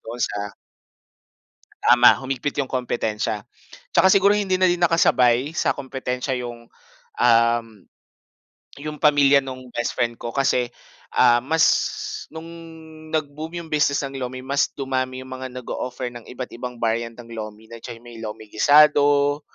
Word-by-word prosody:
doon 120 Hz, +2 st, -8 dB
sa 100 Hz, 0 st, -5 dB, 1.3 s
Tama, 120 Hz, 0 st, +7 dB
humigpit 135 Hz, +2 st, -3 dB
'yong 135 Hz, -, -4 dB
kompetensiya. 110 Hz, -4 st, -2 dB, 0.5 s
'Tsaka -, -, +4 dB
siguro 200 Hz, +1 st, +5 dB
hindi 200 Hz, -3 st, 0 dB
na 185 Hz, 0 st, +3 dB
din 175 Hz, -, 0 dB
nakasabay 130 Hz, -6 st, +3 dB
sa -, -, +1 dB
kompetensiya 130 Hz, 0 st, -3 dB
'yong, 120 Hz, -1 st, -8 dB, 0.5 s
um, 115 Hz, -1 st, +4 dB, 1.1 s
'yong 150 Hz, +1 st, -7 dB
pamilya 140 Hz, -2 st, +5 dB
no'ng 130 Hz, -2 st, -9 dB
best 120 Hz, -, -3 dB
friend 120 Hz, -1 st, -1 dB
ko 120 Hz, -, -4 dB
kasi, 125 Hz, -1 st, +1 dB, 0.5 s
ah, 120 Hz, -1 st, +5 dB
mas 160 Hz, +5 st, +2 dB, 0.6 s
no'ng 160 Hz, +1 st, -9 dB, 0.6 s
nag-boom 155 Hz, +2 st, -4 dB
'yong 170 Hz, -2 st, -8 dB
business 145 Hz, -1 st, +2 dB
ng 135 Hz, 0 st, -6 dB
lomi 130 Hz, 0 st, -5 dB
mas 140 Hz, +1 st, +1 dB
dumami 130 Hz, -1 st, -2 dB
'yong 130 Hz, -, -13 dB
mga 130 Hz, 0 st, -6 dB
nag-o-offer 125 Hz, 0 st, -5 dB
ng 120 Hz, -2 st, -10 dB
iba't 125 Hz, 0 st, -7 dB
ibang 125 Hz, 0 st, -7 dB
variant 115 Hz, 0 st, -2 dB
ng 120 Hz, -1 st, -12 dB
lomi. 110 Hz, 0 st, -8 dB
Nandiyan 115 Hz, 0 st, -9 dB
'yong 120 Hz, -, -22 dB
may 120 Hz, -1 st, -11 dB
lomi 110 Hz, 0 st, -7 dB
gisado, 145 Hz, +2 st, +4 dB
130 Hz, 145 wpm, -22 LUFS, 120-145 Hz, 1.3 s, Tama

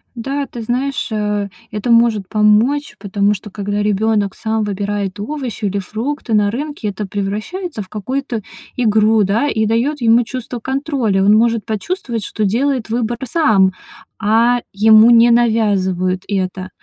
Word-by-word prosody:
Да, 275 Hz, +4 st, -3 dB
ты 235 Hz, -, -8 dB
знаешь, 260 Hz, +4 st, -2 dB
э, 210 Hz, -1 st, -1 dB, 0.2 s
это 210 Hz, +3 st, -2 dB
может 230 Hz, -4 st, +3 dB
помочь, 225 Hz, +8 st, +2 dB
потому 200 Hz, 0 st, 0 dB
что 210 Hz, +1 st, -8 dB
когда 205 Hz, +1 st, -3 dB
ребёнок 210 Hz, -1 st, 0 dB
сам 220 Hz, 0 st, -2 dB
выбирает 205 Hz, -1 st, -3 dB
овощи 255 Hz, -2 st, -4 dB
или 200 Hz, 0 st, -1 dB
фрукты 225 Hz, +5 st, -4 dB
на 205 Hz, -1 st, +3 dB
рынке, 285 Hz, -2 st, -4 dB
это 200 Hz, 0 st, -5 dB
превращается 210 Hz, -, -4 dB
в -, -, -18 dB
какую-то 240 Hz, +3 st, -4 dB, 0.3 s
игру, 220 Hz, -2 st, +3 dB
да, 220 Hz, +9 st, +1 dB
и 220 Hz, -4 st, 0 dB
даёт 245 Hz, +7 st, 0 dB
ему 235 Hz, +1 st, +4 dB
чувство 245 Hz, 0 st, -6 dB
контроля. 265 Hz, -7 st, -1 dB
Он 205 Hz, +2 st, +5 dB
может 230 Hz, -1 st, +2 dB
почувствовать, 230 Hz, -, -3 dB
что 215 Hz, -, -3 dB
делает 250 Hz, +3 st, 0 dB
выбор 235 Hz, 0 st, -1 dB
сам, 220 Hz, -, +3 dB, 0.5 s
а 230 Hz, +3 st, +3 dB
ему 220 Hz, +3 st, +6 dB
не 235 Hz, 0 st, +6 dB
навязывают 195 Hz, -6 st, +1 dB
это. 185 Hz, -1 st, -3 dB
220 Hz, 145 wpm, -17 LUFS, 205-240 Hz, 0.5 s, ему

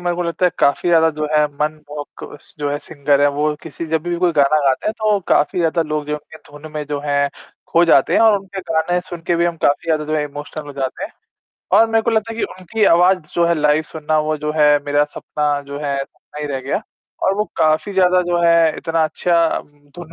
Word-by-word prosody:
मेरे 175 Hz, -1 st, -1 dB
को 180 Hz, -, -1 dB
लगता 170 Hz, +1 st, -2 dB
है -, -, +2 dB
काफ़ी 140 Hz, +5 st, +2 dB
ज़्यादा 165 Hz, -1 st, +5 dB
जो 155 Hz, 0 st, -1 dB
है 150 Hz, 0 st, +4 dB, 0.2 s
मनमोहक 150 Hz, -1 st, -5 dB
स -, -, -20 dB
जो 145 Hz, -1 st, -2 dB
है 145 Hz, -, -2 dB
सिंगर 145 Hz, -1 st, 0 dB
हैं। 145 Hz, -, +5 dB
वो 150 Hz, +1 st, +1 dB
किसी 165 Hz, +1 st, -7 dB
जब 160 Hz, -1 st, -1 dB
भी 175 Hz, 0 st, -2 dB
कोई 175 Hz, -1 st, +2 dB
गाना 145 Hz, +1 st, +4 dB
गाते 135 Hz, -1 st, +1 dB
हैं 215 Hz, -, +1 dB
तो 215 Hz, -2 st, +2 dB
काफ़ी 150 Hz, -, +2 dB
ज़्यादा 165 Hz, 0 st, +1 dB
लोग 155 Hz, -1 st, -3 dB
जो 150 Hz, -, -3 dB
हैं -, -, -4 dB
उनके 160 Hz, -, -15 dB
धुन 145 Hz, +2 st, -11 dB
में 150 Hz, -1 st, -3 dB
जो 145 Hz, -1 st, -3 dB
है, 140 Hz, -1 st, +1 dB, 0.4 s
खो 170 Hz, +1 st, +4 dB
जाते 140 Hz, -5 st, +4 dB
हैं -, -, +4 dB
और 220 Hz, -2 st, +5 dB
उनके 195 Hz, 0 st, -8 dB
गाने 175 Hz, +1 st, 0 dB
सुन 175 Hz, -1 st, -9 dB
के 170 Hz, -, +2 dB
भी 170 Hz, -, +2 dB
हम 170 Hz, -1 st, -1 dB
काफ़ी 145 Hz, +3 st, +1 dB
ज़्यादा 155 Hz, -2 st, 0 dB
जो 155 Hz, +1 st, -2 dB
है 150 Hz, -, 0 dB
इमोशनल 145 Hz, +1 st, -8 dB
हो 145 Hz, -, -8 dB
जाते 135 Hz, -, -4 dB
हैं। 310 Hz, -, -8 dB, 0.6 s
और 225 Hz, -, +6 dB
मेरे 225 Hz, 0 st, +2 dB
को 235 Hz, -, 0 dB
लगता 225 Hz, 0 st, 0 dB
है 225 Hz, -, -9 dB
कि -, -, +1 dB
उनकी 185 Hz, +4 st, -2 dB
आवाज़ 180 Hz, +1 st, +5 dB, 0.2 s
जो 170 Hz, -, +3 dB
है 170 Hz, -, +2 dB
लाइव 150 Hz, 0 st, +2 dB
सुनना 155 Hz, -1 st, -1 dB
वो 155 Hz, 0 st, -1 dB
जो 150 Hz, +1 st, -3 dB
है 150 Hz, -1 st, +5 dB
मेरा 145 Hz, 0 st, +2 dB
सपना 145 Hz, -1 st, -2 dB
जो 140 Hz, 0 st, -6 dB
है 140 Hz, -1 st, -1 dB
सपना 150 Hz, -, -13 dB
ही 150 Hz, -, -3 dB
रह 135 Hz, -2 st, -3 dB
गया। 135 Hz, +10 st, -2 dB, 0.4 s
और 190 Hz, -, +2 dB
वो 210 Hz, -, +1 dB
काफ़ी 155 Hz, +6 st, +1 dB
ज़्यादा 185 Hz, -1 st, +3 dB
जो 175 Hz, -1 st, 0 dB
है 170 Hz, -2 st, +4 dB
इतना 165 Hz, -1 st, 0 dB
अच्छा 170 Hz, +1 st, +1 dB
उम, -, -, -13 dB, 0.3 s
धुन 175 Hz, -2 st, -10 dB
155 Hz, 250 wpm, -19 LUFS, 150-175 Hz, 0.6 s, और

